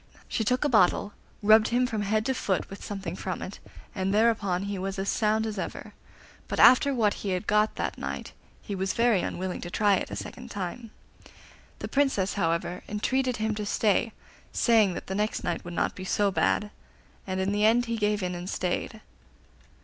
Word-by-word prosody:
She 225 - -1
took 250 +6 +1
a - - +4
bottle, 205 -3 +3 0.3
rubbed 215 +1 +6
him 245 +1 +2
from 220 -4 -2
head 215 +2 0
to 265 - +1
foot 195 -7 -2
with 195 - -9
something 195 -4 -5
from 185 -1 -4
it, 195 - -8 0.3
and 190 -1 -1
thereupon 205 -4 +2
he 200 -1 -3
was 195 +1 -3
as 195 +1 -2
sound 220 0 +1
as 215 -3 -4
ever; - - -6 0.5
but - - -3
after 255 +2 +7
what 225 -6 +2
he 200 - -3
had 180 - -7
got 210 +1 +2
that - - -3
night - - -5 0.3
he 205 - -5
was 190 0 -1
very 230 -5 +3
unwilling 185 0 -4
to 175 - -6
try 205 +2 +3
it - - -4
a - - -5
second 245 0 -8
time. 205 +3 -5 0.9
The - - -5
Princess, 270 -9 +1
however, 170 -1 -1
entreated 255 +4 0
him 220 0 -1
to 210 0 -4
stay, 210 +2 +1 0.4
saying 220 -6 +3
that - - -6
the 190 - -4
next 210 +2 -1
night 175 - -2
would 175 0 -7
not - - 0
be 185 - -8
so 200 +1 +1
bad, 210 +2 +1 0.6
and 190 0 -2
in 190 +1 0
the 205 +1 0
end 235 +3 +4
he 230 -1 -2
gave 210 -2 0
in 180 0 -2
and 175 +1 -6
stayed. 195 +4 -2
205 Hz, 200 wpm, -27 LUFS, 190-225 Hz, 0.9 s, after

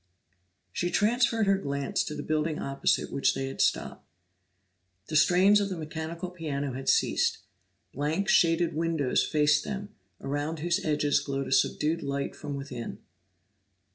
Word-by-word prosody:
She 175 - -1
transferred 225 +2 +2
her 195 -1 +3
glance 140 -4 -1
to 150 - -5
the 145 - -5
building 155 0 -1
opposite 135 0 0
which 140 - +1
they 135 - -2
had 135 - -4
stopped. - - 0 1.1
The 155 - -3
strains 185 +6 +5
of 200 - -1
the 185 - -4
mechanical 165 +3 -5
piano 145 -6 -3
had 135 +1 -3
ceased; - - +2 0.6
blank, 155 +8 -1
shaded 170 -6 +3
windows 160 -5 +1
faced 150 -1 +2
them, 205 0 -5 0.3
around 145 +3 -3
whose 175 +5 -1
edges 150 -1 +2
glowed 135 -1 -3
a - - -7
subdued 150 +4 +1
light 140 0 -3
from 145 -2 -6
within. 135 -4 -6
155 Hz, 145 wpm, -28 LUFS, 140-175 Hz, 1.1 s, strains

